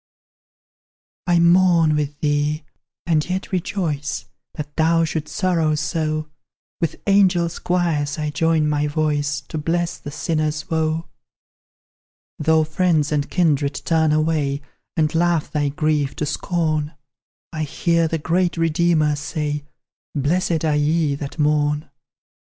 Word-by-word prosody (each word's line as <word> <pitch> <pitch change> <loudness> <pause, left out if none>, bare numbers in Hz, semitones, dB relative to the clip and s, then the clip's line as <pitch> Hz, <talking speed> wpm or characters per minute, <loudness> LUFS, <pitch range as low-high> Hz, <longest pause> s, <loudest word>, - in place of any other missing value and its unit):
I 175 -1 +4
mourn 170 -2 +5
with 150 -1 -3
thee, 150 +1 0 0.4
and 160 -3 +2
yet 185 +1 -3
rejoice 165 -6 -2 0.3
That 150 -2 -7
thou 165 +1 +3
shouldst 155 -1 -4
sorrow 170 -6 +1
so; 155 0 -1 0.5
With 165 -2 -2
angel 190 -4 +4 0.2
choirs 165 -5 0
I 150 -1 -2
join 160 +1 +2
my 150 0 +1
voice 145 -1 0
To 155 - -3
bless 170 +2 -1
the - - -7
sinner's 155 +2 -2
woe. 160 0 0 1.3
Though 160 +1 +3
friends 155 -1 +1
and 145 -1 0
kindred 150 -5 +1
turn 160 -2 +2
away, 150 -2 0 0.3
And 155 0 +2
laugh 170 -1 +1
thy 145 -2 0
grief 150 -1 0
to 150 - -2
scorn; 155 -1 -1 0.6
I 155 - -3
hear 165 +2 +1
the 165 - -1
great 170 +3 0
Redeemer 165 -2 +2
say, 145 0 -3 0.5
"Blessed 165 +3 +1
are 155 -1 +2
ye 150 0 +2
that 140 +1 -6
mourn." 150 -1 +1
155 Hz, 125 wpm, -21 LUFS, 150-170 Hz, 1.3 s, mourn